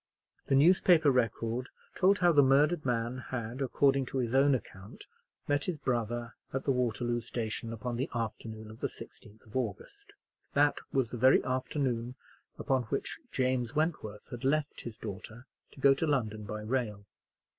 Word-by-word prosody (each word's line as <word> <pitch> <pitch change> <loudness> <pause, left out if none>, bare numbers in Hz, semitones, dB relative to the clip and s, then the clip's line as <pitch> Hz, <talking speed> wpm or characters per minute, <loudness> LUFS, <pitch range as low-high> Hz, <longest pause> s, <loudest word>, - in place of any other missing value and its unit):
The 135 - +3
newspaper 160 0 +5
record 120 0 0 0.2
told 195 +2 +4
how 175 -2 +4
the 145 -3 +6
murdered 145 +4 +4
man 120 +1 -1
had, 120 +1 -4
according 135 0 +2
to 135 - -4
his 120 -2 -1
own 135 +1 +5
account, 100 -4 -9 0.4
met 145 0 +1
his 180 -4 -2
brother 120 -2 -2 0.2
at 135 - -2
the 140 - +1
Waterloo 120 -1 0
station 115 0 -4
upon 115 +1 -4
the 130 - -2
afternoon 110 -1 -5
of 110 - -13
the - - 0
16th 105 +1 -13
of 110 - -17
August. 405 - -4 0.4
That 145 0 +4
was 130 -4 0
the 125 - -4
very 130 +3 +5
afternoon 130 -2 -2 0.4
upon 130 -3 0
which - - -3
James 130 0 0
Wentworth 150 -10 -2
had 120 +1 -7
left 150 +2 0
his 115 -2 -8
daughter 110 +2 -8 0.3
to - - -15
go 135 0 +6
to 160 +4 -1
London 110 -7 -1
by 105 +1 -5
rail. 105 -3 -2
125 Hz, 165 wpm, -31 LUFS, 115-140 Hz, 0.4 s, the